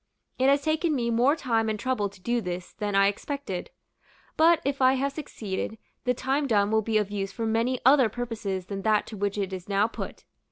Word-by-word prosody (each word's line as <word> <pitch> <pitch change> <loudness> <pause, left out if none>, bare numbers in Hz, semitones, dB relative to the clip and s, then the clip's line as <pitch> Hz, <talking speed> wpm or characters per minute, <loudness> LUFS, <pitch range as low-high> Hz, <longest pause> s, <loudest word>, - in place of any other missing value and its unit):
It 260 +1 +4
has 280 0 +3
taken 315 +1 +1
me 235 -3 0
more 250 +6 +4
time 230 -7 0
and 215 -1 -2
trouble 250 -5 0
to 195 - -17
do 235 +5 0
this 180 -2 -5
than 205 -1 -3
I 195 0 +5
expected; 205 -1 -3 0.7
but, 330 +1 +5
if 275 0 -1
I 260 0 +6
have 275 +1 0
succeeded, 220 -8 -5 0.3
the 250 0 +2
thing 275 +4 0
done 205 -3 +2
will 220 0 +3
be 220 0 +1
of 205 -1 0
use 195 -1 -3
for 225 +3 -4
many 230 +3 +1
other 265 -3 +6
purposes 215 -5 -4
than 195 0 -5
that 215 0 +2
to 220 - -8
which 200 0 -2
it 195 -2 -2
is 185 +1 -7
now 200 +1 +3
put. 230 - -7
225 Hz, 215 wpm, -27 LUFS, 200-260 Hz, 0.7 s, I